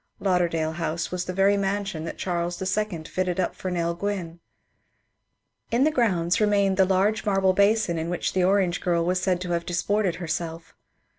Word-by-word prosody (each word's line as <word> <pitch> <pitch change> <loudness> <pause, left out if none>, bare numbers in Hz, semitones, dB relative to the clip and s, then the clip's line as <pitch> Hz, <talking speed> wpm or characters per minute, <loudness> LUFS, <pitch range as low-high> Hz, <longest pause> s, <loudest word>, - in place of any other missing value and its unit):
Lauderdale 170 -4 +1
House 165 0 -3
was 180 -1 -2
the - - -3
very 195 +2 +3
mansion 195 -4 -2
that - - -6
Charles 175 -1 -2
U 190 -2 -2
fitted 185 +2 -2
up 185 - 0
for 185 - -5
Nell 170 -1 -1
Gwynne. 175 -2 -4 1.3
Li 235 - +2
the 285 +5 +3
grounds 185 - +1
remained 200 -2 +2
the 190 - +5
large 195 +3 +1
marble 195 -2 +2
basin 200 -3 +2
in 160 +1 -3
which 175 - -2
the 185 - +2
orange 185 -2 +2
girl 170 -2 +1
was 180 +1 0
said 185 -1 +1
to 180 -1 -4
have 170 0 0
disported 185 +2 0
herself. 165 -1 -5
185 Hz, 175 wpm, -25 LUFS, 170-200 Hz, 1.3 s, the